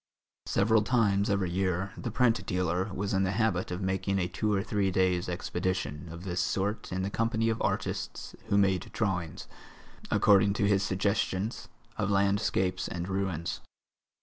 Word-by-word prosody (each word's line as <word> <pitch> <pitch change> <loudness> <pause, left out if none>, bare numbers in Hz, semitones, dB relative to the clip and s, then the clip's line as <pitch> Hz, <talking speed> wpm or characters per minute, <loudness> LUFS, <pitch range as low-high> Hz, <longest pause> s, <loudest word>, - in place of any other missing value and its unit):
Several 110 +2 +3
times 105 -3 +2
every 100 -3 +1
year 95 +1 0
the - - -4
print 115 -5 +2
dealer 90 +2 0
was 100 +1 -2
in 95 - +2
the 95 -1 +1
habit 110 -5 +1
of 90 +2 -4
making 95 +1 0
a 90 -2 0
two 105 +4 -1
or 95 -1 +1
three 105 -2 0
days' 90 -1 +1
expedition 90 -3 -3
of 85 +2 -8
this 90 -2 -1
sort 100 +4 -1
in 95 0 -1
the 100 - -2
company 115 0 +1
of 110 0 -1
artists - - -3
who 100 -2 +2
made 95 -3 +2
drawings, 90 -6 -2 0.6
according 100 -1 +5
to 100 - +1
his 100 -1 +3
suggestions, 100 +2 -1 0.3
of 100 - 0
landscapes 100 -2 +1
and 85 0 -4
ruins. 95 -3 -2
95 Hz, 160 wpm, -29 LUFS, 90-100 Hz, 0.6 s, according